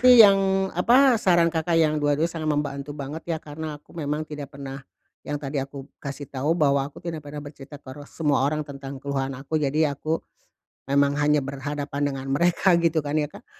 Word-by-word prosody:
nih 250 0 +8
yang, 195 -1 +6 0.3
apa, 240 +6 +5
saran 170 -3 +4
Kakak 165 0 0
yang 155 -2 +3
dua-duanya 145 +2 +2
sangat 165 -2 -3
membantu 145 -1 -2
banget, 145 +3 -5
ya, 165 - 0
karena 155 0 -6
aku 150 - -21
memang 155 -1 -2
tidak 145 -2 -8
pernah, 135 -1 -7 0.4
yang 145 - -4
tadi 140 -1 -3
aku 135 0 -7 0.2
kasih 140 0 -6
tahu, 145 +6 0
bahwa 140 -3 +2
aku 145 - -26
tidak 165 -2 -4
pernah 145 0 -7
bercerita 145 0 -10
ke, 135 -2 -11
re 145 +1 -10
semua 150 -3 +1
orang 150 +1 0
tentang 140 -1 -8
keluhan 135 -1 -3
aku. 150 +3 -2
Jadi 150 +2 +2
aku, 155 +3 -1 0.7
memang 140 0 +3
hanya 150 0 +4
berhadapan 140 +1 -4
dengan 135 0 -6
mereka, 175 +4 +3
gitu 165 -1 +2
kan, 145 - -2
ya, 150 -1 0
Kak. - - -14
145 Hz, 195 wpm, -25 LUFS, 140-160 Hz, 0.7 s, nih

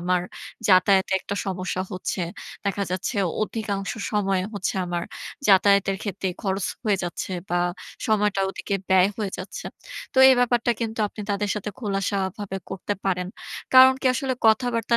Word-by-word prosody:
আমার 180 0 +1 0.5
যাতায়াতের 190 0 +5
একটা 200 - -4
সমস্যা 185 -1 -2
হচ্ছে। 185 0 -3 0.4
দেখা 200 0 -1
যাচ্ছে 185 +6 -2 0.3
অধিকাংশ 205 -3 -3 0.2
সময় 195 -3 +1
হচ্ছে 200 -1 -2
আমার 175 -1 -2 0.4
যাতায়াতের 195 0 +5
ক্ষেত্রে 195 -2 -3
খরচ 195 -2 -1 0.2
হয়ে 210 -3 +3
যাচ্ছে, 175 +2 -4 0.2
বা 175 0 +1 0.5
সময়টা 210 -2 +2
ওদিকে 200 +1 -4
ব্যায় 190 0 +5
হয়ে 210 -3 -2
যাচ্ছে। 185 - -7 0.5
তো - - -20
এই 265 - +7
ব্যাপারটা 240 -1 +2
কিন্তু 225 -1 -3
আপনি 215 - -10
তাদের 205 +1 0
সাথে 210 0 -4
খোলাসা 200 -3 -1 0.2
ভাবে 200 -2 -4
করতে 195 +2 -3
পারেন। 180 -2 0 0.5
কারণ 260 0 +9
কি - - 0
আসলে 260 +1 -1
কথাবার্তা 230 0 +3
200 Hz, 150 wpm, -24 LUFS, 185-215 Hz, 0.5 s, কারণ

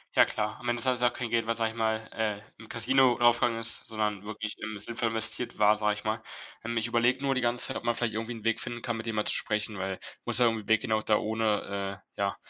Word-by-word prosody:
Ja - - +7
klar, 105 +1 -2
am 120 - -7
Ende 120 0 0
ist 125 -2 +1
auch 120 - +3
kein 125 -2 -4
Geld, 115 -1 +1
was, 115 0 -1
sage 110 -1 +1
ich 115 - -12
mal, 110 -1 +1 0.2
äh, 105 -2 -1 0.2
im 115 0 -13
Casino 125 +2 +4
draufgegangen 120 -1 +3
ist, 115 +1 +3
sondern 105 -3 -2
wirklich 110 0 -3
im 110 -2 -6
sinnvoll 115 +2 -1
investiert 115 +2 +1
war, 105 0 +5
sage 105 0 +1
ich 105 - -7
mal. 110 +1 -1 0.4
Ähm, 120 +1 -3
ich 115 - +1
überlege 120 +2 +2
nur 135 -1 +1
die 130 - 0
ganze 120 0 +1
Zeit, - - -3
ob - - -8
man 120 - +1
vielleicht 115 -2 -2
irgendwie 115 +2 -3
'n 110 -2 -10
Weg 115 -1 +1
finden 120 -1 -5
kann, 120 -2 -2
mit 110 - -6
dem 110 -1 -3
mal 105 - 0
zu - - +2
sprechen, 105 -1 0
weil 95 0 -4 0.3
musst 120 +1 +2
ja 125 - +5
irgendwie 115 -2 -1
'n - - -14
Weg 110 -1 +4
geben 115 -4 -1
auch 110 - +1
da 105 -1 +3
ohne, 105 -3 -2
äh, - - -31 0.2
ja, 100 -1 0
110 Hz, 280 wpm, -28 LUFS, 105-120 Hz, 0.4 s, Ja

